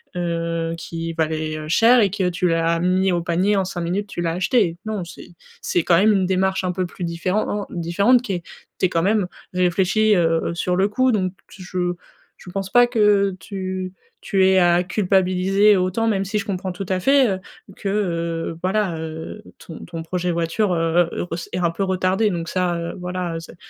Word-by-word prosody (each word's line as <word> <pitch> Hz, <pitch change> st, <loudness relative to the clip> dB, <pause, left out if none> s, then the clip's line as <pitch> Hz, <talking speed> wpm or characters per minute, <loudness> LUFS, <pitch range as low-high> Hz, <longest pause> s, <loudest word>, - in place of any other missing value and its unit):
heu, 165 Hz, -1 st, -2 dB
qui 165 Hz, 0 st, -5 dB
valait, 155 Hz, -1 st, -2 dB
heu, 155 Hz, 0 st, -7 dB
cher 230 Hz, +9 st, +5 dB
et 200 Hz, -4 st, +2 dB
que 190 Hz, -3 st, 0 dB
tu 180 Hz, +1 st, 0 dB
l'as 165 Hz, 0 st, +1 dB
mis 185 Hz, +2 st, +2 dB
au 175 Hz, -1 st, 0 dB
panier 180 Hz, +4 st, +1 dB
en 195 Hz, -1 st, +1 dB
5 180 Hz, -1 st, -5 dB
minutes, 180 Hz, +5 st, -1 dB
tu 200 Hz, -, -6 dB
l'as 165 Hz, -1 st, -1 dB
acheté. 185 Hz, -1 st, +1 dB
Non, 215 Hz, -4 st, -3 dB
c'est 170 Hz, +2 st, -11 dB, 0.3 s
c'est 175 Hz, -, +1 dB
quand 170 Hz, +1 st, +3 dB
même 215 Hz, +3 st, +5 dB
une 190 Hz, -2 st, +1 dB
démarche 190 Hz, 0 st, +1 dB
un 180 Hz, -1 st, -1 dB
peu 185 Hz, 0 st, -1 dB
plus 175 Hz, 0 st, -6 dB
différen-en 185 Hz, +4 st, -1 dB
différente 200 Hz, +9 st, +2 dB
qui 220 Hz, -6 st, -4 dB
est 175 Hz, -2 st, -4 dB, 0.3 s
tu -, -, +1 dB
es -, -, +2 dB
quand 165 Hz, -, 0 dB
même 205 Hz, +2 st, +2 dB, 0.3 s
réfléchi, 190 Hz, +4 st, +2 dB
heu, 170 Hz, -3 st, +3 dB
heu, -, -, -2 dB
heu, -, -, -3 dB
sur 180 Hz, +1 st, 0 dB
le 195 Hz, +3 st, +2 dB
coup. 255 Hz, +4 st, +2 dB
Donc 185 Hz, -4 st, 0 dB, 0.2 s
je 180 Hz, -1 st, -3 dB, 0.4 s
je 180 Hz, -, -13 dB
pense 195 Hz, 0 st, -4 dB
pas 245 Hz, +3 st, +6 dB
que 205 Hz, -4 st, +3 dB
tu 185 Hz, +1 st, -5 dB, 0.3 s
tu 190 Hz, -2 st, +2 dB
aies 190 Hz, 0 st, +5 dB
à 175 Hz, 0 st, +4 dB
culpabiliser 190 Hz, +1 st, +2 dB
autant, 185 Hz, +5 st, 0 dB
même 195 Hz, -2 st, 0 dB
si 210 Hz, +3 st, -1 dB
je 200 Hz, -, -5 dB
comprends 185 Hz, -2 st, -3 dB
tout 195 Hz, +2 st, -6 dB
à 185 Hz, -1 st, +1 dB
fait, 270 Hz, +3 st, +4 dB
heu, -, -, -8 dB, 0.4 s
que, 200 Hz, -, -5 dB
heu, 170 Hz, -5 st, -2 dB
voilà, 190 Hz, -2 st, 0 dB
heu, 160 Hz, +5 st, -7 dB, 0.2 s
ton 165 Hz, -, -9 dB
ton 165 Hz, -2 st, -7 dB
projet 180 Hz, +1 st, -2 dB
voiture, 170 Hz, +4 st, 0 dB
heu, 165 Hz, +1 st, +2 dB
heu, -, -, -3 dB
ress 165 Hz, 0 st, -4 dB
est -, -, -1 dB
un 170 Hz, -2 st, +1 dB
peu 195 Hz, -, -2 dB
retardé. 190 Hz, +3 st, +1 dB
Donc 170 Hz, -3 st, -3 dB
ça, 180 Hz, -2 st, 0 dB
heu, 170 Hz, 0 st, -5 dB
voilà, 180 Hz, -1 st, -3 dB
heu, -, -, -3 dB
c'est 165 Hz, -, -12 dB
185 Hz, 215 wpm, -21 LUFS, 170-195 Hz, 0.4 s, pas